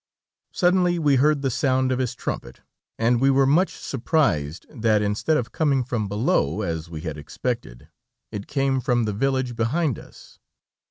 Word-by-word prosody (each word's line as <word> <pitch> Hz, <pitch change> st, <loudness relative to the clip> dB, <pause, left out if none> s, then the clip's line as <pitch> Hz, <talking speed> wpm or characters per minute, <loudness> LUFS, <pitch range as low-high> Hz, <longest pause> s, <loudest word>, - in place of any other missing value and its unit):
Suddenly 180 Hz, -1 st, +2 dB
we 145 Hz, -4 st, +3 dB
heard 145 Hz, +1 st, +3 dB
the 135 Hz, -, +1 dB
sound 130 Hz, +1 st, +1 dB
of 130 Hz, -, 0 dB
his 125 Hz, -2 st, -1 dB
trumpet, -, -, -5 dB, 0.4 s
and 120 Hz, +1 st, +2 dB
we 135 Hz, -, +4 dB
were 135 Hz, 0 st, +4 dB
much 165 Hz, +8 st, +2 dB
surprised 115 Hz, -, 0 dB
that 110 Hz, -5 st, +2 dB
instead 105 Hz, +9 st, +1 dB
of 120 Hz, -, -3 dB
coming 140 Hz, -5 st, +1 dB
from 115 Hz, -4 st, -2 dB
below, 100 Hz, -, 0 dB
as 85 Hz, -3 st, -3 dB
we 80 Hz, -2 st, -7 dB
had 80 Hz, -3 st, -5 dB
expected, 80 Hz, -, -5 dB, 0.4 s
it 105 Hz, -2 st, -6 dB
came 135 Hz, -2 st, 0 dB
from 120 Hz, -1 st, +1 dB
the 105 Hz, -, -2 dB
village 130 Hz, +2 st, 0 dB
behind 130 Hz, +4 st, 0 dB
us. -, -, -16 dB
125 Hz, 165 wpm, -24 LUFS, 105-140 Hz, 0.4 s, we